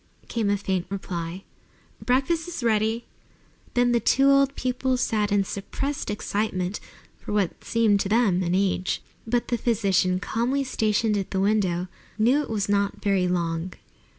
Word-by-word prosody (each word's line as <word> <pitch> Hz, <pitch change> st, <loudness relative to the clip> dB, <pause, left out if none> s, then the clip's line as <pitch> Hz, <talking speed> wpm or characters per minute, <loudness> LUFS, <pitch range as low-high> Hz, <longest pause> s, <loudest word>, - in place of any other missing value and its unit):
came 225 Hz, -4 st, -1 dB
a 205 Hz, -, +2 dB
faint 190 Hz, -3 st, -2 dB
reply. 180 Hz, -2 st, -5 dB, 0.6 s
"Breakfast 295 Hz, +7 st, +1 dB
is 340 Hz, -8 st, -5 dB
ready!" 225 Hz, +1 st, +1 dB, 0.7 s
Then 245 Hz, 0 st, +3 dB
the 240 Hz, -, +3 dB
two 270 Hz, +5 st, +4 dB
old 275 Hz, 0 st, +3 dB
people 255 Hz, 0 st, 0 dB
sat 215 Hz, -4 st, 0 dB
in 205 Hz, -1 st, +3 dB
suppressed 270 Hz, +9 st, -4 dB
excitement 205 Hz, -2 st, -2 dB, 0.4 s
for -, -, -6 dB
what 200 Hz, -4 st, -1 dB
seemed 220 Hz, -3 st, +2 dB
to 195 Hz, -, -1 dB
them 210 Hz, -5 st, +3 dB
an 175 Hz, 0 st, 0 dB
age. 190 Hz, -1 st, 0 dB, 0.2 s
But 240 Hz, +1 st, 0 dB
the 240 Hz, -, 0 dB
physician, 195 Hz, -6 st, +2 dB
calmly 245 Hz, +7 st, 0 dB
stationed 220 Hz, -4 st, +1 dB
at 195 Hz, -, -4 dB
the 190 Hz, -, -1 dB
window, 190 Hz, -3 st, +1 dB, 0.3 s
knew 245 Hz, +7 st, +3 dB
it 295 Hz, -, -6 dB
was 210 Hz, -3 st, -1 dB
not 200 Hz, 0 st, 0 dB
very 195 Hz, -3 st, +2 dB
long. 170 Hz, 0 st, -1 dB
210 Hz, 155 wpm, -25 LUFS, 190-240 Hz, 0.7 s, two